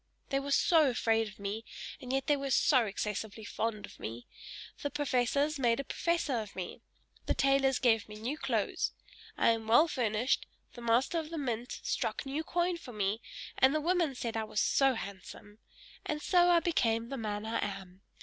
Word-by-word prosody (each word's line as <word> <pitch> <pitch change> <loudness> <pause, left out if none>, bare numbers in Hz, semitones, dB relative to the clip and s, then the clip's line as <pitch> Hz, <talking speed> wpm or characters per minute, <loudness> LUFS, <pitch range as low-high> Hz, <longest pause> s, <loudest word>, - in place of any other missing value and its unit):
They 275 - +1
were 275 +1 -5
so 310 +1 +4
afraid 225 -2 +1
of 210 - -11
me, 205 +2 -4 0.4
and 255 -1 -5
yet 270 0 0
they 295 - +3
were 275 -1 -3
so 255 -1 +4
excessively 210 +1 -4
fond 215 -1 -3
of - - -15
me. 115 +2 -6 0.6
The 285 - -1
professors 285 +1 0
made 235 -2 +2
a - - -1
professor 325 -4 0
of 210 -2 -7
me; 185 +5 -6 0.5
the - - +1
tailors 275 -1 +3
gave 225 -4 +2
me 210 - -8
new 230 +7 -3
clothes 255 -8 -1 0.4
I - - +4
am 225 -1 0
well 240 +9 +6
furnished; 235 -3 0 0.3
the 240 - -10
master 240 +8 +2
of 310 -1 -6
the 330 - -5
mint 245 -4 -3
struck - - -2
new 280 +4 -2
coin 350 +1 0
for 255 -7 -10
me, 210 +1 -1 0.4
and 265 +3 +5
the - - +2
women 335 -3 +1
said 230 -2 -4
I 225 - 0
was 215 -1 -2
so 270 -2 +3
handsome! 200 +1 -9 0.4
And 300 - -2
so 355 +2 +4
I 345 -1 +5
became 230 -9 +1
the 275 - -3
man 210 -2 -3
I 225 - -1
am. 195 -2 -6
245 Hz, 190 wpm, -32 LUFS, 220-285 Hz, 0.6 s, well